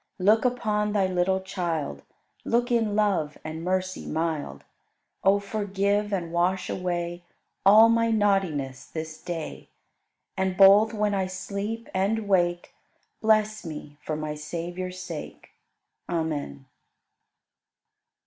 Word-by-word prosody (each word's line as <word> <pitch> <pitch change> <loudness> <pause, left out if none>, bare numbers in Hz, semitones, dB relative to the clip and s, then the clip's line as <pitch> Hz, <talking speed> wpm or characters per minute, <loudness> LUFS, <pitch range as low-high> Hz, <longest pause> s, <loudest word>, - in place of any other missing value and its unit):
Look 215 +5 +4
upon 210 -4 0
Thy 200 -2 +3
little 185 +1 +1
child, 165 - -3 0.4
Look 240 +1 +1
in 225 -3 +2
love 195 -8 +1
and 155 +1 -6
mercy 185 +1 -2
mild. 160 -1 -2 0.6
O 195 +1 +5
forgive 200 0 -1
and 175 -4 -2
wash 180 +2 +1
away 175 -1 -3 0.5
All 215 +3 +9
my 230 0 +3
naughtiness 190 -11 +1
this 160 -1 -7
day, 165 -3 -6 0.7
And 190 -1 -1
both 200 +3 +7
when 210 -2 0
I 190 -1 0
sleep 200 +4 -5
and 205 +3 0
wake 175 -3 +1 0.5
Bless 215 -1 +2
me 150 -2 -8
for 155 - -2
my 155 0 -3
Savior's 175 +4 -5
sake. 175 -4 -8 0.6
Amen. 150 - -3
185 Hz, 115 wpm, -26 LUFS, 165-210 Hz, 0.7 s, All